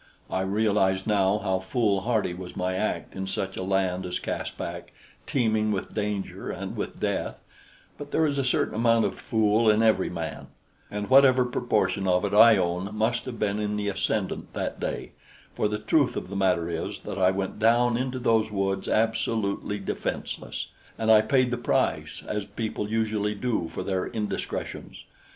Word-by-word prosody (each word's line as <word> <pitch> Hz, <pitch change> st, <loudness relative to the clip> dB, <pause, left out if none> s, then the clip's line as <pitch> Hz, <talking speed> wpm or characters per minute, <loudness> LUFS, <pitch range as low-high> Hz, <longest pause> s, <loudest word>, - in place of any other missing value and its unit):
I 95 Hz, -, 0 dB
realize 95 Hz, -1 st, +1 dB
now 100 Hz, -2 st, +3 dB
how 95 Hz, -2 st, +1 dB
foolhardy 105 Hz, 0 st, 0 dB
was 90 Hz, 0 st, -8 dB
my 90 Hz, 0 st, 0 dB
act -, -, -2 dB
in 95 Hz, 0 st, -4 dB
such 95 Hz, 0 st, -3 dB
a -, -, -4 dB
land 95 Hz, -1 st, 0 dB
as 90 Hz, -, -2 dB
Caspak, -, -, -5 dB, 0.4 s
teeming 110 Hz, -4 st, +1 dB
with 95 Hz, -2 st, -3 dB
danger 105 Hz, -2 st, -3 dB
and -, -, -5 dB
with -, -, -5 dB
death; -, -, -2 dB, 0.6 s
but 145 Hz, -1 st, -7 dB
there 160 Hz, -, +2 dB
is 140 Hz, -2 st, 0 dB
a -, -, +1 dB
certain 125 Hz, -, +1 dB
amount 115 Hz, 0 st, +3 dB
of -, -, -3 dB
fool 110 Hz, 0 st, +2 dB
in 110 Hz, +1 st, +4 dB
every 110 Hz, -4 st, +3 dB
man; 85 Hz, -2 st, -5 dB, 0.4 s
and 105 Hz, 0 st, -4 dB
whatever 130 Hz, -1 st, +6 dB
proportion 110 Hz, -5 st, 0 dB
of 90 Hz, +2 st, +3 dB
it 100 Hz, -, -2 dB
I 110 Hz, +1 st, +8 dB
own 90 Hz, +1 st, -1 dB
must 115 Hz, +2 st, 0 dB
have 125 Hz, -3 st, -6 dB
been 105 Hz, -1 st, 0 dB
in 105 Hz, 0 st, -1 dB
the 105 Hz, -1 st, -1 dB
ascendant 100 Hz, 0 st, -2 dB
that -, -, -3 dB
day, -, -, -4 dB, 0.4 s
for 105 Hz, -, +1 dB
the 105 Hz, 0 st, -2 dB
truth -, -, +2 dB
of -, -, -5 dB
the 100 Hz, -, -6 dB
matter 90 Hz, -4 st, +2 dB
is 85 Hz, -1 st, -4 dB
that 95 Hz, -, -5 dB
I 95 Hz, 0 st, +5 dB
went 95 Hz, +2 st, -3 dB
down 120 Hz, +2 st, +4 dB
into 130 Hz, +1 st, -2 dB
those 115 Hz, -3 st, +2 dB
woods 95 Hz, -2 st, -1 dB
absolutely 110 Hz, -2 st, 0 dB
defenseless; 100 Hz, -, -4 dB, 0.3 s
and 110 Hz, 0 st, +2 dB
I 110 Hz, -1 st, +8 dB
paid 130 Hz, +2 st, +2 dB
the 125 Hz, -, 0 dB
price, 120 Hz, -, -1 dB
as 105 Hz, -1 st, -2 dB
people 105 Hz, 0 st, -4 dB
usually 105 Hz, -1 st, 0 dB
do 110 Hz, -5 st, -1 dB
for 80 Hz, -, -5 dB
their 95 Hz, -2 st, -1 dB
indiscretions. 105 Hz, -2 st, -4 dB
105 Hz, 175 wpm, -26 LUFS, 95-115 Hz, 0.6 s, I